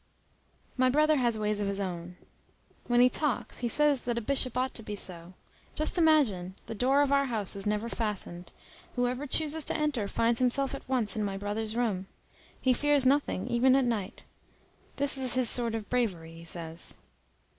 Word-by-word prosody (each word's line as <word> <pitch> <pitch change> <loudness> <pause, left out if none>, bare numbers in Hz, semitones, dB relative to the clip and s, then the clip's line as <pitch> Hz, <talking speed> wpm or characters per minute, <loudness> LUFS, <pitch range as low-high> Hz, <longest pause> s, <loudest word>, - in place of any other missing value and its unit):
My 255 0 +3
brother 305 +3 +3
has 240 -4 +1
ways 210 -1 -1
of 205 - -1
his 200 0 -2
own. 180 -2 -5 0.7
When 240 0 +4
he 250 - +7
talks, 285 +2 -1
he 245 - -1
says 290 +2 +4
that 240 -1 -1
a - - -1
bishop 255 0 0
ought 255 +1 0
to - - -4
be 210 -1 -6
so. 180 -2 -4 0.4
Just 310 - +1
imagine! 265 - +3
the 225 - -6
door 265 +6 +3
of 280 - -1
our 280 0 +3
house 220 -7 -2
is 200 +1 -5
never 210 +2 -1
fastened. 205 -6 -4 0.4
Whoever 250 +3 -1
chooses 310 +2 +1
to - - 0
enter 290 -9 -1
finds 230 +3 +1
himself 260 +2 +1
at 275 - -8
once 245 -6 0
in 215 - -1
my 195 -1 -3
brother's 215 +2 -3
room. 210 -6 -1 0.5
He 260 - +3
fears 290 +1 +2
nothing, 265 -7 +1
even 250 +2 +3
at 270 -1 +3
night. 215 -6 -3 0.7
That 285 0 0
is 255 -2 +1
his 255 -3 +3
sort 235 -2 +2
of 220 -2 -5
bravery, 185 -10 -2
he 165 0 -12
says. 165 0 -3
240 Hz, 190 wpm, -29 LUFS, 205-265 Hz, 0.7 s, he